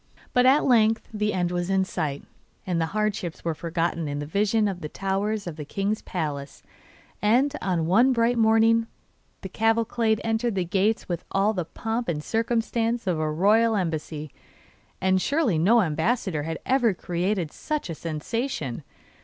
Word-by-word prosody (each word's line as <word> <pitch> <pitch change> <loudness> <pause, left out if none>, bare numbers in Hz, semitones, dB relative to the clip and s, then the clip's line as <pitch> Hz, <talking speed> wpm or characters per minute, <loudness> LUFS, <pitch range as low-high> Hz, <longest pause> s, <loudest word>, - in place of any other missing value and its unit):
But 250 0 +4
at 275 +3 +5
length 225 -3 +3
the 210 0 0
end 180 -2 -1
was 175 0 -2
in 190 -1 +2
sight, 150 -7 -3 0.4
and 175 -3 0
the 160 - 0
hardships 205 -7 -2
were 165 - 0
forgotten 165 0 -2
in 145 0 -3
the 145 - -4
vision 210 +6 +1
of 185 -3 -4
the 150 - -5
towers 195 +3 -2
of 170 -3 -6
the 150 - -5
king's 200 +7 -2
palace; 145 -5 -5 0.6
and, 255 +8 +3
one 185 +8 +3
bright 235 0 +2
morning, 225 +1 +4 0.5
the 190 - -6
cavalcade 225 +1 +1
entered 225 0 0
the 185 -2 0
gates 200 +5 0
with 175 -1 -3
all 200 +3 +2
the 180 -5 -2
pomp 225 +6 -3
and 150 -3 -2
circumstance 230 +1 0
of 180 -4 0
a 155 -1 0
royal 215 +7 +3
embassy. 155 -5 -3 0.7
And 190 0 +2
surely 275 - +1
no 225 +8 +5
ambassador 165 +1 0
had 160 +2 -4
ever 245 -6 +2
created 175 -1 -2
such 305 -1 -3
a 165 - -4
sensation! 160 - -4
195 Hz, 160 wpm, -25 LUFS, 165-225 Hz, 0.7 s, at